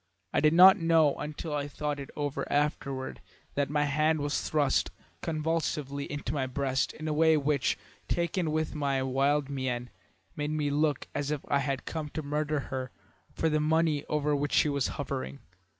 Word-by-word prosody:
I -, -, +3 dB
did 155 Hz, +1 st, +4 dB
not 190 Hz, +4 st, +9 dB
know 165 Hz, -3 st, +4 dB
until 150 Hz, +1 st, -5 dB
I 145 Hz, -1 st, -1 dB
thought 145 Hz, 0 st, -3 dB
it 140 Hz, -, -7 dB
over 145 Hz, -2 st, -3 dB
afterward 140 Hz, -2 st, -1 dB, 0.3 s
that 140 Hz, -1 st, 0 dB
my 150 Hz, 0 st, +2 dB
hand 155 Hz, +2 st, +2 dB
was 145 Hz, 0 st, -1 dB
thrust 150 Hz, -3 st, +2 dB, 0.3 s
convulsively 155 Hz, -3 st, -2 dB
into 145 Hz, 0 st, -3 dB
my 135 Hz, -3 st, -1 dB
breast 130 Hz, 0 st, 0 dB
in 155 Hz, -, -6 dB
a 155 Hz, -, 0 dB
way 160 Hz, +1 st, +4 dB
which, 145 Hz, -2 st, +1 dB, 0.3 s
taken 170 Hz, 0 st, 0 dB
with 155 Hz, 0 st, -1 dB
my 140 Hz, -3 st, 0 dB
wild 135 Hz, +2 st, +1 dB
mien, 130 Hz, -3 st, -3 dB, 0.4 s
made 150 Hz, 0 st, -2 dB
me 150 Hz, -2 st, 0 dB
look 150 Hz, 0 st, +1 dB
as 145 Hz, 0 st, -2 dB
if 150 Hz, -2 st, -3 dB
I 140 Hz, -, +3 dB
had 140 Hz, -1 st, -2 dB
come 155 Hz, -2 st, -4 dB
to 155 Hz, -, -2 dB
murder 150 Hz, +1 st, -1 dB
her 130 Hz, -1 st, -3 dB, 0.4 s
for 160 Hz, -, 0 dB
the 155 Hz, -1 st, +2 dB
money 155 Hz, -1 st, +2 dB
over 150 Hz, -1 st, +1 dB
which 145 Hz, 0 st, -1 dB
she 150 Hz, -, +4 dB
was 140 Hz, -2 st, 0 dB
hovering. 65 Hz, +1 st, -4 dB
145 Hz, 180 wpm, -29 LUFS, 140-155 Hz, 0.4 s, not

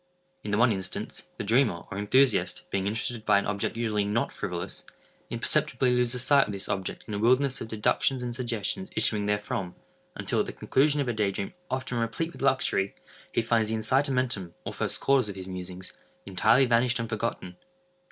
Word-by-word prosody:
In 105 Hz, -, -5 dB
the 105 Hz, -, +1 dB
one 120 Hz, +1 st, +5 dB
instance, 95 Hz, -3 st, -5 dB
the -, -, -3 dB
dreamer, 110 Hz, -4 st, +2 dB
or 95 Hz, -, -4 dB
enthusiast, 105 Hz, -4 st, +2 dB
being 95 Hz, 0 st, 0 dB
interested 110 Hz, +2 st, -2 dB
by -, -, +4 dB
an 100 Hz, -, 0 dB
object 105 Hz, +2 st, -2 dB
usually 110 Hz, -3 st, 0 dB
not 105 Hz, +3 st, 0 dB
frivolous, 90 Hz, -1 st, -4 dB, 0.5 s
imperceptibly 130 Hz, +2 st, +1 dB
loses 125 Hz, 0 st, +1 dB
sight 140 Hz, +1 st, +5 dB
of -, -, -4 dB
this 100 Hz, -1 st, -5 dB
object 95 Hz, -1 st, -3 dB
in 105 Hz, -, -5 dB
a 100 Hz, -, -2 dB
wilderness 130 Hz, +4 st, +3 dB
of 115 Hz, -, -4 dB
deductions 115 Hz, +4 st, +1 dB
and 120 Hz, -1 st, -3 dB
suggestions 120 Hz, -, -2 dB
issuing 105 Hz, -2 st, +4 dB
therefrom, 105 Hz, -3 st, -2 dB, 0.4 s
until, -, -, -1 dB
at -, -, +1 dB
the -, -, -5 dB
conclusion 145 Hz, +2 st, +2 dB
of 135 Hz, -, -2 dB
a 120 Hz, -, 0 dB
day 105 Hz, -2 st, +1 dB
dream 100 Hz, 0 st, -4 dB, 0.2 s
often 130 Hz, -2 st, -2 dB
replete 115 Hz, +9 st, -2 dB
with -, -, -11 dB
luxury, 130 Hz, -7 st, +2 dB, 0.4 s
he 115 Hz, -, +1 dB
finds 115 Hz, -1 st, +2 dB
the 110 Hz, -, 0 dB
incitamentum, 125 Hz, -, 0 dB
or -, -, -4 dB
first -, -, -2 dB
cause 135 Hz, -5 st, +3 dB
of 100 Hz, -, -6 dB
his 95 Hz, -1 st, -7 dB
musings, 90 Hz, 0 st, -6 dB, 0.3 s
entirely 110 Hz, +7 st, +4 dB
vanished 120 Hz, +1 st, +3 dB
and 115 Hz, -, -2 dB
forgotten. 110 Hz, -5 st, -3 dB
115 Hz, 190 wpm, -28 LUFS, 100-125 Hz, 0.5 s, one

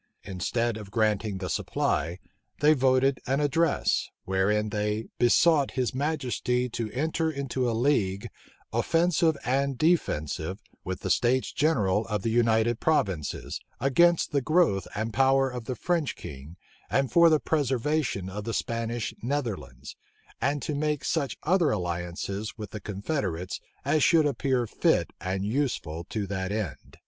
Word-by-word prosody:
Instead 115 Hz, +5 st, -1 dB
of 105 Hz, -3 st, -9 dB
granting 105 Hz, -1 st, 0 dB
the 95 Hz, -1 st, -4 dB
supply, 85 Hz, 0 st, -1 dB, 0.4 s
they 150 Hz, +1 st, +6 dB
voted 130 Hz, -1 st, +3 dB
an 135 Hz, +2 st, +1 dB
address, 150 Hz, +3 st, +1 dB, 0.2 s
wherein 105 Hz, +3 st, +1 dB
they 105 Hz, +1 st, -1 dB
"besought 140 Hz, +4 st, +4 dB
his 125 Hz, -1 st, 0 dB
majesty 130 Hz, -3 st, -1 dB
to 115 Hz, -2 st, -4 dB
enter 160 Hz, +4 st, 0 dB
into 135 Hz, -4 st, -2 dB
a -, -, 0 dB
league, 110 Hz, -6 st, +1 dB, 0.5 s
offensive 165 Hz, -2 st, +2 dB
and 135 Hz, +1 st, 0 dB
defensive, 95 Hz, -, 0 dB, 0.2 s
with 95 Hz, -1 st, -4 dB
the -, -, -1 dB
states 125 Hz, +2 st, +2 dB
general 105 Hz, -9 st, +1 dB
of 105 Hz, -3 st, -2 dB
the 115 Hz, -, 0 dB
United 115 Hz, 0 st, +2 dB
Provinces, 95 Hz, -, -1 dB, 0.2 s
against 170 Hz, +6 st, +3 dB
the 140 Hz, -2 st, +1 dB
growth 155 Hz, -, +2 dB
and 110 Hz, +1 st, -2 dB
power 135 Hz, +2 st, +3 dB
of 125 Hz, -2 st, -6 dB
the 130 Hz, -, -3 dB
French 170 Hz, +1 st, -1 dB
king, 70 Hz, +5 st, -10 dB, 0.3 s
and 135 Hz, -1 st, +1 dB
for 170 Hz, -1 st, +7 dB
the 155 Hz, -1 st, +4 dB
preservation 135 Hz, -, 0 dB
of 100 Hz, +2 st, -5 dB
the 115 Hz, +1 st, -3 dB
Spanish 115 Hz, 0 st, -2 dB
Netherlands; 105 Hz, -, -4 dB, 0.5 s
and 140 Hz, +3 st, 0 dB
to 150 Hz, -, -2 dB
make 150 Hz, 0 st, -1 dB
such 140 Hz, -8 st, -1 dB
other 175 Hz, -1 st, +3 dB
alliances 90 Hz, +3 st, -3 dB
with 105 Hz, -3 st, -7 dB
the 105 Hz, -, -6 dB
confederates 100 Hz, -, -3 dB, 0.3 s
as 155 Hz, -, +2 dB
should 160 Hz, -3 st, +5 dB
appear 130 Hz, -3 st, +1 dB
fit -, -, +1 dB
and 95 Hz, +1 st, -2 dB
useful 105 Hz, -, -2 dB
to 105 Hz, -3 st, -3 dB
that 95 Hz, -1 st, -3 dB
end." 100 Hz, -11 st, -5 dB
120 Hz, 145 wpm, -27 LUFS, 100-145 Hz, 0.5 s, for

